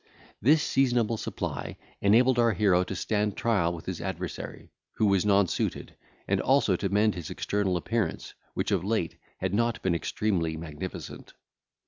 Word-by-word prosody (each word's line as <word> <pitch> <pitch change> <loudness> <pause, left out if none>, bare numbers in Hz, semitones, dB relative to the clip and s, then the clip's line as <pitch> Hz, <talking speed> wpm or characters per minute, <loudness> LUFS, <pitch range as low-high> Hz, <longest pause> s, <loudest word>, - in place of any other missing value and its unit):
This 150 +6 +5
seasonable 120 -5 +2
supply - - -4 0.2
enabled 120 +5 +4
our 115 -1 +4
hero 90 -2 +3
to 95 - -5
stand 105 +2 -1
trial 100 -8 +2
with 85 -2 -7
his 95 -3 -4
adversary, 90 -3 -6 0.2
who 110 - +1
was 100 0 +3
nonsuited, 100 -3 +1 0.3
and - - +1
also - - +3
to 100 - -2
mend 105 +2 +3
his 85 -4 -6
external 100 -3 -1
appearance, 115 +5 -2 0.2
which - - -1
of - - +1
late 100 -5 -1 0.2
had 95 0 -2
not 115 +2 +1
been 95 - +2
extremely 85 -2 -1
magnificent. 80 +3 -7
100 Hz, 150 wpm, -28 LUFS, 90-110 Hz, 0.3 s, This